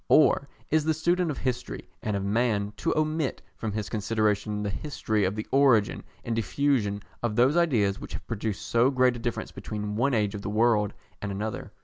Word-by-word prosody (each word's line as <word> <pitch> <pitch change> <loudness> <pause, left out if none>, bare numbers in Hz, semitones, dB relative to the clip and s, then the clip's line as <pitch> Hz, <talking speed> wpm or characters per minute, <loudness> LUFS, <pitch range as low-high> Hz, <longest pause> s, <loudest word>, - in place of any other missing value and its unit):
Or 145 -2 +5 0.2
is 155 0 +3
the 160 0 +1
student 175 +2 +1
of 145 - -3
history 125 -2 -3
and 105 -2 -1
of 100 - -3
man 105 -1 +1
to 165 - 0
omit 155 -2 0
from 110 -3 -4
his 105 -1 -2
consideration 105 -1 0
the 100 - -1
history 110 -5 -1
of 95 +2 -1
the 110 - -4
origin 130 -6 +4 0.2
and 115 -2 -1
diffusion 115 -4 0 0.2
of 115 -3 -1
those 125 +6 +4
ideas 120 - +2
which - - -8
have - - -6
produced 110 -3 -3
so 120 +2 +3
great 130 -2 +3
a - - -6
difference 115 -2 -3
between 105 -1 -5
one 125 +4 +2
age 105 -2 +1
of 105 - -5
the 100 - -4
world 105 -1 +2 0.3
and 105 - -3
another? 105 +3 -4
115 Hz, 200 wpm, -27 LUFS, 105-135 Hz, 0.3 s, Or